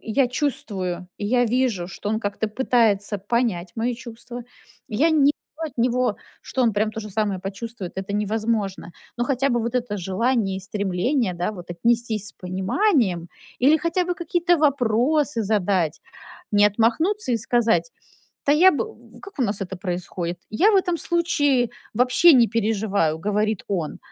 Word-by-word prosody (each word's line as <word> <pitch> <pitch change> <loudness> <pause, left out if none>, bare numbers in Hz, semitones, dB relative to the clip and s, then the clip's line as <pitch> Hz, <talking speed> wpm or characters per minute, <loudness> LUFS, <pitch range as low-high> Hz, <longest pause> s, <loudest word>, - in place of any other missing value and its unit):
я 250 +4 +1
чувствую, 190 - -3
я 245 +4 +2
вижу, 235 -7 0
что 200 - -6
он 220 +1 0
как-то 205 +1 -2
пытается 215 -4 +1
понять 200 -4 -1
мои 235 +2 0
чувства. 240 0 -9 0.4
Я 290 +10 +2
не 300 -3 +4
ду 310 +2 -14
от - - -12
него, 250 +1 +1 0.3
что 260 - -1
он 230 -3 +3
прям 215 +2 0
то 220 - -5
же 210 -1 -8
самое 205 -2 -1
почувствует, 195 0 -6
это 195 +1 -4
невозможно. 210 -3 -1 0.3
Но 240 - +1
хотя 275 +1 +1
бы 240 -2 +1
вот 235 +2 -3
это 235 -4 -1
желание 195 +2 0
и - - -9
стремление, 200 +3 -1
да, 175 +3 -2
вот, 175 -4 -10
отнестись 225 +1 0
с - - -13
пониманием 190 - 0 0.3
или 285 +5 +5
хотя 340 +3 0
бы 355 - -1
какие-то 345 +1 +1
вопросы 280 -1 +2
задать, 190 -6 0 0.5
не 205 0 +5
отмахнуться 250 - +1
и 235 - +3
сказать: 235 - +1 0.6
"Да 285 - +5
я 350 +6 +7
бы" 335 - -1 0.3
В - - -16
как 400 -4 -13
у - - +4
нас 210 -2 -1
это 190 0 -5
происходит? 175 -1 -4
"Я 345 - +4
в - - +5
этом 365 -2 +1
случае 290 -8 +1 0.3
вообще 255 +9 +5
не 240 -2 +6
переживаю",- 205 -7 0
говорит 210 0 0
он. 170 -6 -2
225 Hz, 165 wpm, -23 LUFS, 195-255 Hz, 0.6 s, я